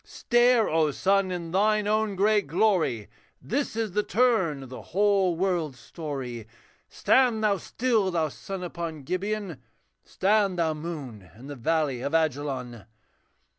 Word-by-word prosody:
Stare, 240 -1 +2
O 160 -1 +2
sun! 195 +5 +1
in 175 -2 -5
thine 210 +3 +2
own 215 -1 0
great 205 0 +2
glory, 165 - +1 0.3
This 275 0 -2
is 225 -3 -2
the 210 +3 +1
turn 210 - +1
of 130 - -11
the 130 - -8
whole 195 -2 +2
world's 170 -6 -1
story. 125 -5 -6 0.4
Stand 245 -4 +2
thou 205 -2 +3
still, 225 -2 0
thou 165 -3 0
sun 190 +5 -7
upon 170 -4 -5
Gibeon, 185 -2 -3 0.4
Stand 200 -1 +1
thou, 165 -2 +1
moon, 145 - -7
in 125 - -12
the 145 0 -7
valley 140 -1 0
of 145 +5 -2
Ajalon! 135 -7 -2
175 Hz, 140 wpm, -26 LUFS, 145-210 Hz, 0.4 s, thou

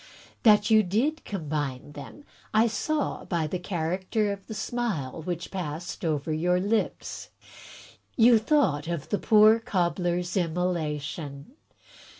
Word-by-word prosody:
That 210 -1 +5
you 220 0 +7
did 235 - 0
combine 145 -7 -4
them 145 - -10 0.3
I 220 +1 +6
saw 290 +7 -1
by 170 -3 -1
the 165 +4 -3
character 185 +4 -1
of 200 -1 -10
the 220 - -6
smile 210 - -3
which 175 +1 -5
passed 175 0 -5
over 155 -1 -1
your 180 +3 +1
lips. 210 +4 -2 0.9
You 235 -1 +6
thought 215 - +1
of 170 -4 -4
the 205 - 0
poor 215 +1 +6
Cobbler's 175 -3 -1
immolation. 160 - -2
180 Hz, 125 wpm, -27 LUFS, 160-215 Hz, 0.9 s, you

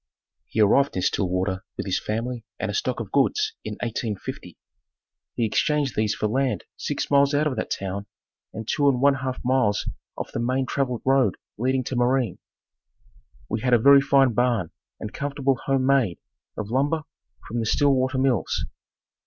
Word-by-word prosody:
He - - -4
arrived 135 +7 +4
in 90 - -1
Stillwater 95 0 0
with - - -3
his 95 - 0
family 115 +2 -3 0.2
and - - -2
a - - -7
stock 425 - -1
of - - -6
goods 430 +1 +2
in - - -4
1850. 115 -3 -4 0.8
He 115 - +1
exchanged 145 +4 +1
these 110 0 +1
for - - -2
land 130 +4 0
six 145 - -3
miles 140 0 +4
out 150 +2 +2
of 145 -4 0
that 110 - -2
town 100 +1 -4 0.4
and 110 -1 -7
two 145 -1 +3
and 125 -3 +1
one 140 +2 +5
half 130 -1 -3
miles 125 -6 +2 0.3
off - - -5
the - - -3
main 130 +3 0
traveled 125 -2 -2
road 130 -7 +3 0.2
leading 130 +3 0
to 130 - -4
Marine. 120 -4 +1 1.1
We 110 0 -2
had 125 -1 +4
a - - +6
very 140 +4 +7
fine 135 -2 +4
barn 120 -7 +1 0.3
and 105 - -6
comfortable 140 -2 -1
home 135 -1 +1
made 130 -10 +2 0.4
of 105 0 -5
lumber 145 +5 +1 0.4
from 120 - -3
the 110 - -1
Stillwater 130 0 +2
Mills. 130 -5 +1
125 Hz, 170 wpm, -24 LUFS, 110-135 Hz, 1.1 s, very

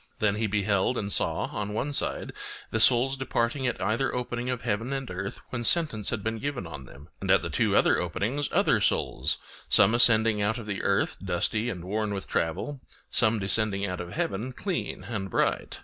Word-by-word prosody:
Then 105 -1 +1
he 110 0 0
beheld 105 +3 +1
and 100 -1 -2
saw - - +3
on 105 0 -3
one 145 +6 -2
side - - -2 0.4
the 110 - 0
souls 125 +4 +4
departing 130 0 -1
at 125 - -2
either 115 +5 0
opening 125 0 -3
of 125 -2 -3
heaven 115 +2 -1
and 135 -4 -4
earth 100 +2 -5
when 120 -2 -3
sentence 115 - +1
had 110 -4 -3
been 110 0 -2
given 140 -8 -3
on 75 -5 -8
them; 70 +3 -14
and - - -4
at - - +5
the - - -4
two - - +2
other - - +4
openings 100 - -2
other - - +3
souls, - - +1 0.3
some 110 - +5
ascending 115 -3 +5
out 110 +3 +1
of 115 - -7
the 100 -2 -3
earth 100 - +1
dusty 100 +5 0
and 90 -6 -6
worn 105 +1 -1
with 95 - -5
travel, 130 - -2 0.3
some 110 -1 +3
descending 100 0 +2
out 90 -2 -3
of 85 -1 -8
heaven 110 +7 -2
clean 185 +5 -3
and 100 -5 -4
bright. - - 0
110 Hz, 195 wpm, -27 LUFS, 100-125 Hz, 0.4 s, at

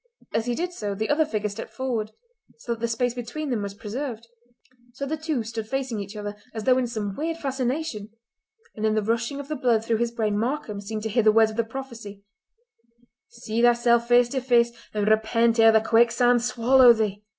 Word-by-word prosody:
As 225 +1 -1
he 240 - 0
did 355 +4 -3
so 205 - -4
the 220 +2 -3
other 310 +2 +3
figure 215 -8 -2
stepped 205 +2 -7
forward, 240 -5 -2 0.5
so 250 - -7
that 230 - -9
the 235 - +1
space 235 +1 -1
between 250 +5 -5
them 230 -4 -1
was 200 -1 -5
preserved. 230 +2 -5 0.7
So 275 +3 -5
the 300 +3 -2
two 310 -6 -2
stood 225 0 -5
facing 260 -4 -2
each 200 +1 -7
other, 205 0 -5 0.2
as 220 - -4
though 255 +1 +4
in 250 - -1
some 210 -4 -4
weird 325 +2 -3
fascination; 265 -5 -3 0.7
and 215 - -6
in 215 0 +2
the 215 - +1
rushing 235 +5 -1
of 285 - -7
the 305 - -3
blood 235 -5 +1
through 230 -1 +1
his 235 +1 0
brain 215 -3 -1
Markam 225 -4 -3
seemed 215 +1 -5
to 220 - -2
hear 235 +3 +2
the 215 0 +5
words 220 0 +4
of 215 - -10
the 230 - +2
prophecy: 225 -4 -9 1.0
"See 230 -1 -4
thyself 235 0 +3
face 245 0 +4
to 265 +1 -2
face, 240 -2 +3 0.2
and 210 -1 -1
repent 225 +2 +2
ere 225 0 +7
the 220 0 +4
quicksand 240 +2 +3
swallow 245 +1 +5
thee." 210 -3 -2
235 Hz, 210 wpm, -25 LUFS, 215-255 Hz, 1.0 s, ere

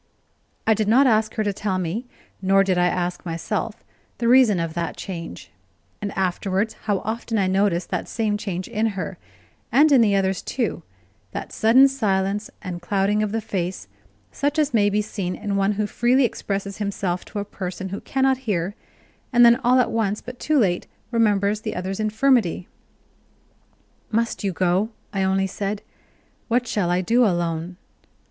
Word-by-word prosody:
I 220 - +5
did 215 -1 -1
not 255 +6 +5
ask 220 -3 +2
her 220 - 0
to 205 -1 0
tell 195 -1 -2
me, 185 +8 -3 0.3
nor 195 +1 +4
did 190 -2 +1
I 180 0 +3
ask 180 0 -2
myself, 200 +6 -3 0.3
the 235 - -1
reason 240 -6 +5
of 165 -1 -2
that 170 0 -3
change; 170 - -7 0.5
and 205 -1 -3
afterwards 190 +3 0
how 205 -3 0
often 225 +1 -2
I 195 - +2
noticed 190 -2 +1
that - - -2
same 220 -2 -1
change 190 -3 -4
in 225 -1 0
her, 185 - -4 0.5
and 300 +2 +5
in 265 -4 +7
the 205 -3 +3
others 190 -1 +1
too 245 -3 -2 0.5
that - - -6
sudden 245 +5 +6
silence 205 -5 -1
and 180 -3 -5
clouding 200 +3 +1
of 210 -1 -1
the 225 +1 -1
face, 185 - -3 0.4
such 290 +2 -1
as 300 -3 +1
may 205 -3 +4
be 210 +1 +1
seen 195 -4 -4
in 205 -1 -3
one 195 +1 +2
who 210 +1 -1
freely 245 +5 +2
expresses 200 -3 -3
himself 195 -3 -2
to - - -8
a 205 - -2
person 190 -1 -5
who 195 - -5
cannot 265 -1 +1
hear, 185 0 0 0.6
and 240 -1 +6
then, 235 0 +7
all 255 -1 +3
at 240 -2 +2
once 210 -2 0
but 250 0 -10
too 305 0 +1
late, 185 -8 +1 0.2
remembers 210 -2 +2
the 215 - -4
other's 190 +2 -3
infirmity. 215 -4 +2 1.4
"Must 230 0 -1
you 195 - 0
go?" 185 +4 +1 0.2
I 195 - 0
only 190 0 +2
said. 200 +2 -3 0.6
"What 245 +1 +1
shall 205 -6 -1
I 180 +1 +2
do 235 +7 +3
alone?". 175 -3 -1
205 Hz, 175 wpm, -23 LUFS, 185-225 Hz, 1.4 s, in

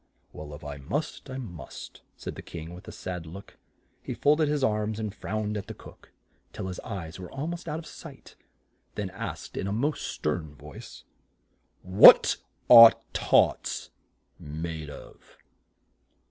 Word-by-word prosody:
"Well, 75 -1 -9
if 75 - -13
I 75 -1 -6
must, 140 - -4
I 130 - -5
must," 90 - -9 0.2
said - - -6
the - - -9
King 85 0 -9
with 90 - -12
a - - -7
sad 90 -3 -6
look. 95 +5 -12 0.4
He - - -6
fold 150 +2 +3
ed 155 - +3
his 145 -2 0
arms 105 -2 0
and 105 -3 -4
frowned 105 +1 -3
at 100 - -6
the - - -8
cook - - -16 0.4
till - - -6
his 90 - -6
eyes 95 -7 -7
were 90 - -9
al 135 +2 -4
most 170 0 -5
out 150 - -3
of 165 - -8
sight, - - -12 0.6
then 100 -3 -4
asked 95 - -7
in 95 - -3
a 125 +10 0
stern 75 -1 -4
voice, 75 +1 -12 0.8
"What 90 +2 +8 0.3
are 115 -1 +11 0.2
tarts - - +1 0.5
made 80 +1 -6
of?" 70 - -14
100 Hz, 160 wpm, -27 LUFS, 80-120 Hz, 0.8 s, are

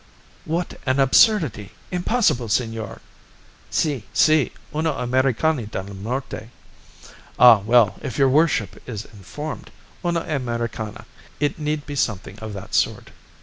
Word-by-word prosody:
"What 170 +2 -3
an 130 +1 +2
absurdity! 135 - +3 0.2
Impossible, 180 - +1
senor!" 115 -2 -2 0.7
"Si! 145 -8 0
Si! 155 -3 +4 0.2
Una 155 0 0
Americana 130 +1 +1
del 100 -1 -6
Norte." 115 +3 -5 0.9
"Ah, 120 -4 +8
well! 110 -1 +3
if 125 - -5
your 135 - +5
worship 145 - +1
is 110 -2 -5
informed. 115 - -8 0.3
Una 170 -1 0
Americana; 120 -7 -4 0.3
it 145 +2 0
need 150 -1 -2
be 145 - -6
something 105 -5 -2
of 110 -1 -6
that 100 - -9
sort." - - 0
125 Hz, 120 wpm, -22 LUFS, 110-155 Hz, 0.9 s, Ah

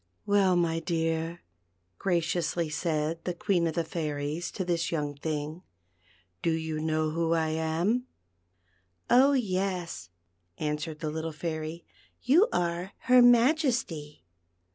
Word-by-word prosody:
•'Well, 195 -3 +4
my 165 -1 +1
dear," 165 0 -1 0.6
graciously 170 -2 0
said 160 0 -1
the 180 - -3
Queen 175 -2 +1
of 160 - -3
the 170 - +1
Fairies 155 0 -3
to 185 - -3
this 170 -1 0
young 150 -3 -1
thing, 150 +2 -4 0.8
"do - - +1
you 160 -1 -1
know 155 0 0
who 165 +1 0
I 160 -1 +1
am 165 +10 0 0.5
?" 90 0 -41 0.3
"Oh 270 +3 +6
yes," 185 - -2 0.5
answered 150 +1 -3
the 155 -2 -2
little 160 +1 -3
Fairy, 160 +1 -5 0.4
"you 330 - +5
are 175 +2 -1
her 250 0 +6
Majesty." 240 - +3
165 Hz, 125 wpm, -28 LUFS, 155-180 Hz, 0.8 s, Oh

